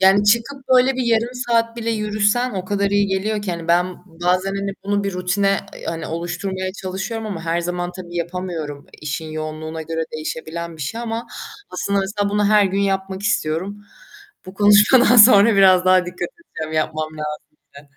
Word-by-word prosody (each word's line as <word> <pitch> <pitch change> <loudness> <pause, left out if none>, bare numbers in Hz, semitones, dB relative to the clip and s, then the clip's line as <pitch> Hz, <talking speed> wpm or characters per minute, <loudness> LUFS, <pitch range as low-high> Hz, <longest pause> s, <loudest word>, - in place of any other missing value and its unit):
Yani 195 +2 +5
çıkıp 235 +6 +1
böyle 255 +1 +4
bir 260 - 0
yarım 235 +1 +1
saat 230 -2 0
bile 230 -1 -2
yürüsen 215 +3 +1
o 185 -1 -3
kadar 200 0 0
iyi 205 0 +2
geliyor 205 +2 -1
ki 195 - -3
hani 170 -1 -6
ben 180 +2 +2
bazen 180 +3 -1
hani 195 0 -2
bunu 200 0 0
bir 200 - -2
rutine 195 +2 +1 0.3
hani 165 -1 -4
oluşturmaya 185 +3 -4
çalışıyorum 195 +4 -5
ama 195 -6 -5
her 165 +1 0
zaman 175 +1 -3
tabii 175 -1 -9
yapamıyorum, 170 -4 -4 0.2
işin 155 +1 -4
yoğunluğuna 155 +1 -5
göre 160 0 -3
değişebilen 160 +2 -5
bir 155 - -6
şey 225 +12 -4
ama 230 0 -4 0.4
aslında 200 0 -1
mesela 200 +1 -1
bunu 205 +1 +1
her 210 -1 +5
gün 195 +1 0
yapmak 195 -1 -1
istiyorum. 200 +1 -1 0.6
Bu 185 - -10
konuşmadan 210 +5 +6
sonra 215 -1 +8
biraz 185 -2 +6
daha 185 -1 +4
dikkat 180 -1 -4
edeceğim 160 - -8
yapmam 155 0 -1 0.5
lazım. 145 -1 -18
190 Hz, 170 wpm, -20 LUFS, 170-210 Hz, 0.6 s, sonra